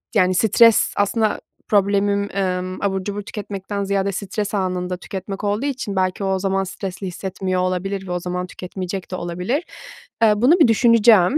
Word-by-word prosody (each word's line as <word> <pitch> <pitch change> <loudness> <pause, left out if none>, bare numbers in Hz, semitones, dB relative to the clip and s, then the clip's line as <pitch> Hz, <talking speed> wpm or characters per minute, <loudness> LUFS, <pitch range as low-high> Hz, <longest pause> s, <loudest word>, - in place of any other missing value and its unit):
yani, 185 -2 +3
stres, 230 +2 +5
aslında, 215 +1 +1 0.3
problemim, 200 0 +2
emm, 185 -1 -2
abur 190 -1 -1
cubur 205 +1 -4
tüketmekten 200 -1 -5
ziyade 195 0 0
stres 200 +2 -3
anında 180 -2 -1
tüketmek 195 +2 -6
olduğu 205 +5 0
için, 250 -8 -3
belki, 185 +1 0
o - - 0
o 190 - 0
zaman 195 0 0
stresli 190 0 -6
hissetmiyor 185 0 -3
olabilir 190 +1 -2
ve 180 - -5
o 180 - -1
zaman 180 +1 -3
tüketmeyecek 185 +1 -6
de - - -2
olabilir. 180 - -2 0.6
Eee, 215 - +6
bunu 275 - +4
bir 310 - +7
düşüneceğim. 230 0 +5
195 Hz, 165 wpm, -21 LUFS, 185-205 Hz, 0.6 s, bir